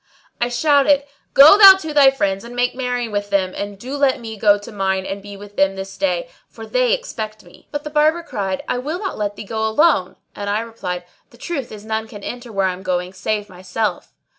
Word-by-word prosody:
I 240 - +1
shouted, 285 +2 +3 0.3
"Go 310 +9 +9
thou 390 -2 +12
to 315 -5 -6
thy 285 -2 +7
friends 195 -7 -1
and 235 +1 -10
make 245 0 +1
merry 250 -2 -2
with 205 -1 -3
them; 185 -2 0
and 205 0 -5
do 255 +7 -6
let 280 -2 +2
me 225 -2 -7
go 205 -1 +4
to 205 +3 -11
mine 190 -2 -1
and 200 +1 -5
be 200 0 -10
with 205 +1 -13
them 195 0 +2
this 195 0 -7
day, - - -1 0.2
for - - -10
they - - +1
expect 220 - -4
me." 175 - -19
But 290 -1 -5
the 300 - -7
Barber 310 +3 +2
cried, 195 - -3
"I 245 - -1
will 300 +7 -3
not 385 - -5
let 205 -1 -2
thee - - -7
go 220 +2 -4
alone;" 220 - +2 0.2
and 205 0 -4
I 210 +2 0
replied, 185 -6 -5 0.3
"The 235 - -19
truth 275 -2 -5
is 210 0 -10
none 220 0 -3
can 205 -2 -11
enter 245 -1 -7
where 195 -2 0
I 185 - 0
am 180 - -10
going 180 -1 -2
save 210 +2 -2
myself." 185 +3 -4
220 Hz, 230 wpm, -20 LUFS, 200-280 Hz, 0.3 s, thou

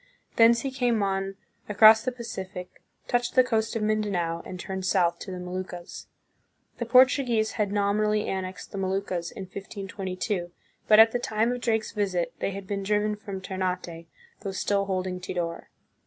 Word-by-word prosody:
Thence 230 0 +6
he 270 - -3
came 245 -5 +1
on 195 0 -1 0.3
across 215 +2 +8
the 255 - -1
Pacific, 190 -6 -7 0.3
touched 245 0 0
the 255 - +7
coast 225 -3 0
of 225 - -1
Mindanao, 200 -6 0
and 185 - -7
turned 190 +1 -5
south 175 -3 +2
to - - -8
the 185 - -5
Moluccas. 180 -1 -7 0.7
The 235 - -3
Portuguese 250 -3 +4
had 210 -3 -1
nominally 210 +1 +1
annexed 190 -1 -4
the 200 - -5
Moluccas 190 -2 -2
in 195 - -8
1522, 190 -1 -5 0.4
but 215 - +7
at 225 +1 +8
the 245 - -1
time 225 0 0
of 245 0 -3
Drake's 220 -2 0
visit 190 -5 -1
they - - -1
had 195 0 -6
been 200 0 -3
driven 210 +1 +1
from 200 -2 -7
Ternate, 180 -3 -4 0.3
though 195 - -4
still 200 +1 0
holding 185 -1 -2
Tidor. 175 -2 -4
200 Hz, 165 wpm, -27 LUFS, 185-220 Hz, 0.7 s, across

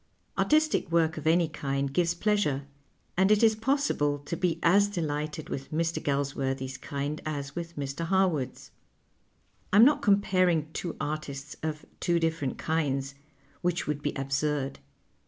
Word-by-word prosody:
Artistic 310 - +2
work 165 -1 +2
of 155 0 -4
any 165 +1 +4
kind 140 -3 -2
gives 170 +2 +2
j)leasure, 185 -9 +1 0.5
and 190 +2 +4
it 215 +1 +4
is 220 -1 +6
possible 220 - +1
to 170 - -3
be 170 -1 0
as 200 +4 +5
delighted 155 -4 -3
with 135 0 -5
Mr. 165 +1 0
Galsworthy's 135 -2 -1
kind 145 +2 -4
as 145 -2 -4
with 170 0 -5
Mr. 140 +3 -3
Ilarwood's. 175 -8 0 1.0
I - - +2
am 220 +3 +9
not 290 +2 +4
eomj)aring 185 -6 +2
two 170 - -4
artists 145 -1 -4
of 155 -1 -4
two 170 -1 +2
different 160 -5 -1
kinds, 140 -4 -1 0.5
wjiieh 175 -1 0
would 150 -1 -2
be 145 - -1
absurd. 135 0 -1
155 Hz, 145 wpm, -28 LUFS, 140-175 Hz, 1.0 s, am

